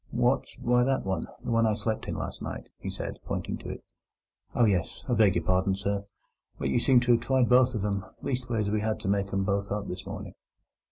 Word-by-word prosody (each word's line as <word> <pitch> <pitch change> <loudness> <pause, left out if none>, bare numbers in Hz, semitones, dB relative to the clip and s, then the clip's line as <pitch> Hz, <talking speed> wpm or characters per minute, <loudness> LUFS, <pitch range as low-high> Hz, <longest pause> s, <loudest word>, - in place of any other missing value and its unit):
"What? 120 +3 +2
Why, 125 +1 +3
that 135 +1 +1
one—the 95 +3 -3
one 115 -1 +4
I 110 - +2
slept 110 0 -2
in - - -2
last - - -5
night," - - -6
he - - -5
said, - - -5
pointing - - -3
to - - -8
it. - - -7 0.7
"Oh 120 - +5
yes! 95 -5 0
I 125 - +1
beg 110 -5 +5
your 85 - +1
pardon, 95 +2 +2
sir, 100 0 -2 0.5
but - - -1
you 120 - +3
seemed 125 0 +5
to 120 - +3
have 120 -1 +4
tried 130 0 +3
both 125 0 +5
of 105 -2 -1
"em; 100 -1 -1 0.2
leastways, 120 -6 -1
we 105 - +1
had 110 0 -1
to 110 - -4
make 100 0 +1
'em 95 0 +1
both 100 0 -1
up 105 -1 -2
this 90 - -6
morning." - - -6
110 Hz, 225 wpm, -28 LUFS, 100-120 Hz, 0.7 s, Oh